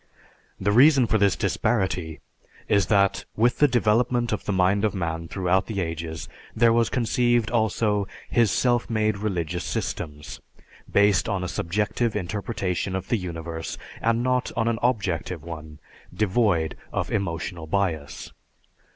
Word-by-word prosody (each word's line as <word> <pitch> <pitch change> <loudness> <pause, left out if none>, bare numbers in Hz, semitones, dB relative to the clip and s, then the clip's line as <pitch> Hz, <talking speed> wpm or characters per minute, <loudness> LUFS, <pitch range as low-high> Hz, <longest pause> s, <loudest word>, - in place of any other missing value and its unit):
The 100 +2 +1
reason 135 +3 +6
for 110 -1 +1
this 100 -2 +3
disparity 90 - -1 0.5
is 100 -4 +3
that 100 -1 +2
with 120 +3 +2
the 145 - +6
development 120 0 +2
of - - -3
the - - -1
mind 95 +2 +2
of 105 -1 +1
man 85 -2 -3
throughout 95 +1 0
the 110 -3 -3
ages 80 -2 -4 0.3
there 115 0 +4
was 115 -1 +2
conceived 120 -1 +1
also 110 -3 +1 0.2
his 115 -3 +3
self 120 +2 +1
made 110 -2 0
religious 90 -5 -2
systems, 75 -2 -5 0.5
based 100 -2 +3
on 95 -2 -1
a - - -2
subjective 105 +7 -1
interpretation 95 -1 -2
of 95 0 -5
the 120 - +2
universe, 85 -3 -5 0.2
and 115 +1 +1
not 125 0 0
on 115 -1 +1
an 115 -1 0
objective 90 -8 -1
one, 80 -2 -9 0.3
devoid 100 -6 +1 0.2
of - - -2
emotional 85 -2 -3
bias. 80 -5 -2
100 Hz, 140 wpm, -25 LUFS, 85-115 Hz, 0.5 s, reason